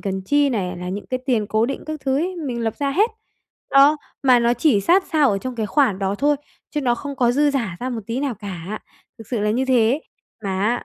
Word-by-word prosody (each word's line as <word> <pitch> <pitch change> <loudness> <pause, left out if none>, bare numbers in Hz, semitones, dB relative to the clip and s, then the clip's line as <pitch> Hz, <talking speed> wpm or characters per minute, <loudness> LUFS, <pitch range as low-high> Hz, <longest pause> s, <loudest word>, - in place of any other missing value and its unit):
cần 190 -1 -3
chi 290 +8 +2
này, 185 -6 -2
là 180 +1 -6
những 200 +3 -5
cái 255 - -2
tiền 230 -6 +1
cố 215 +2 +1
định 275 - -4
các 310 -1 -5
thứ 265 -1 0
ấy, 360 +5 -1
mình 260 -7 -4
lập 225 -1 -2
ra 280 -1 -1
hết. 420 +10 +2 0.6
Đó, 280 +2 +6 0.3
mà 255 -2 +6
nó 235 +1 +2
chỉ 240 -4 +3
sát 365 - +3
sao 300 -5 +4
ở 195 - 0
trong 255 +3 -5
cái 220 -2 -1
khoản 215 -2 +2
đó 195 0 -1
thôi 290 +6 +2 0.3
chứ 300 - -2
nó 245 -3 +2
không 280 +3 -7
có 245 -2 +3
dư 290 +3 +3
dả 230 -11 -2
ra 255 - -2
một 235 -3 -3
tí 235 +3 -2
nào 275 -4 -1
cả, 200 -1 -6 0.4
thực 225 - -11
sự 240 -4 -1
là 210 +1 +1
như 250 +5 +1
thế. 255 +1 +3 0.4
Mà 190 -1 -2
á 230 +4 0
245 Hz, 255 wpm, -21 LUFS, 210-280 Hz, 0.6 s, Đó